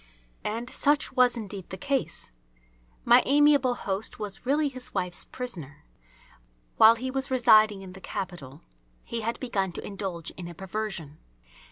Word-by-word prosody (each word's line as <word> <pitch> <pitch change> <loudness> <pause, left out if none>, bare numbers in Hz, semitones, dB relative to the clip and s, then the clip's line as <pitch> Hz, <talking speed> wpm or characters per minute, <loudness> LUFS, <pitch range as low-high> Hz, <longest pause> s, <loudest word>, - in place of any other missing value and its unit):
And 230 +3 -3
such 290 +3 +1
was 250 -1 +4
indeed 200 -4 -7
the 190 - -6
case. 275 - -2 0.7
My - - +7
amiable 285 -3 +4
host 200 0 -3
was 210 +3 -5
really 295 +2 +2
his 255 -3 -6
wife's 180 -2 -2
prisoner. 170 - -5 0.9
While 225 +1 +8
he 260 +3 -4
was 270 +1 -2
residing 215 -5 +5
in 185 -1 -10
the 190 - -12
capital 170 -8 -6 0.4
he 235 - -4
had 230 +2 -2
begun 195 -8 -1
to - - -6
indulge 190 -5 -5
in 175 - -8
a 175 - -9
perversion. 190 -5 -5
215 Hz, 150 wpm, -27 LUFS, 190-255 Hz, 0.9 s, While